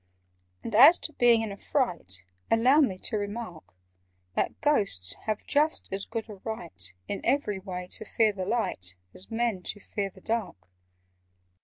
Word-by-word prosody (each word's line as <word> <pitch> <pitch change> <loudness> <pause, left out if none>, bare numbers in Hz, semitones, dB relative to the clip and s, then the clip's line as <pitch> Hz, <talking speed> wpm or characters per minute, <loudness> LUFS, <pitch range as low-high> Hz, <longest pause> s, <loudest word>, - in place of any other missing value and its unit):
"And 225 - -5
as 275 +11 +9
to 310 - -5
being 235 -3 +4
in 215 - -4
a 200 - -7
fright, 170 - -1 0.3
Allow 250 +6 +5
me 200 -10 +1
to 215 - -1
remark 205 - -6 0.6
That - - -1
Ghosts 195 - +2
have 215 -1 -2
just 300 -6 +1
as 195 +1 -2
good 225 -1 -4
a 210 -2 -9
right 90 - -4 0.2
In 200 - -3
every 210 -9 +1
way, 180 -2 -6
to - - -5
fear 215 0 +2
the 190 -2 -4
light, 140 - -2 0.2
As 185 - -12
Men 225 -4 -1
to 205 - +4
fear 200 0 -3
the - - -17
dark." 205 - -4
210 Hz, 165 wpm, -28 LUFS, 185-235 Hz, 0.6 s, as